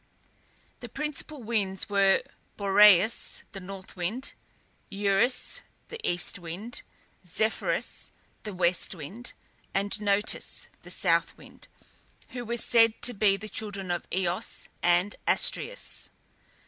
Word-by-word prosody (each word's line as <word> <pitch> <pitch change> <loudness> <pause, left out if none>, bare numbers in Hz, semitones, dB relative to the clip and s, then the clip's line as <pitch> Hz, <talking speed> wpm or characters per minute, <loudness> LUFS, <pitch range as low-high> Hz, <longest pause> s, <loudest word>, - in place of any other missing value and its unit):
The 240 - -8
principal 300 0 -4
winds 200 -4 -1
were: 195 -1 +4 0.3
Boreas 205 +1 +5
(the 195 - -7
north 190 0 -9
wind), 205 +9 -3 0.6
Eurus 205 +5 +1 0.3
(the 460 - -7
east 175 +2 0
wind), 180 +8 -6 0.4
Zephyrus 215 +5 -1 0.3
(the 215 - -6
west 180 +1 +1
wind), 190 - -8 0.4
and 200 +2 0
Notus 205 0 0
(the - - -13
south - - +1
wind), - - -16 0.6
who 245 -1 -5
were 235 +1 -2
said 230 -1 +4
to 245 - +5
be 200 -2 +3
the 210 +2 -8
children 200 -4 -3
of 175 - -2
Eos 180 -1 -2
and 175 +3 +3
Astræus. - - 0
200 Hz, 115 wpm, -28 LUFS, 185-225 Hz, 0.6 s, Boreas